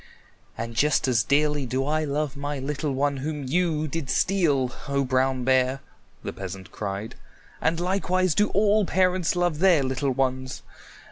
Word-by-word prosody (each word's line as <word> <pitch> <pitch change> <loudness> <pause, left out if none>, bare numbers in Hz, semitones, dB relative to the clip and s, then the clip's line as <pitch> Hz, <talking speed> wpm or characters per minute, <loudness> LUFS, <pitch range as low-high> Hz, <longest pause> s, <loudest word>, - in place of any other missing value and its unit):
"And 115 +1 -4
just 145 +4 +2
as 120 -4 +3
dearly 145 -1 +1
do 130 +2 -1
I 155 +2 0
love 150 0 -2
my 145 +1 -4
little 140 +2 -3
one 140 +1 0
whom 145 +2 -4
you 155 +2 0
did 150 -2 -4
steal, 145 -11 +2 0.2
O 140 -1 0
Brown 130 0 +1
Bear," 130 +1 +2 0.4
the - - -4
peasant 95 0 -8
cried. 100 +1 -5 0.5
"And 165 +1 +1
likewise 185 -1 +1
do 210 +4 +3
all 210 +2 +3
parents 185 -2 +1
love 175 -3 0
their 175 -6 +5
little 135 +1 -1
ones. 130 0 -2
145 Hz, 155 wpm, -25 LUFS, 130-165 Hz, 0.5 s, their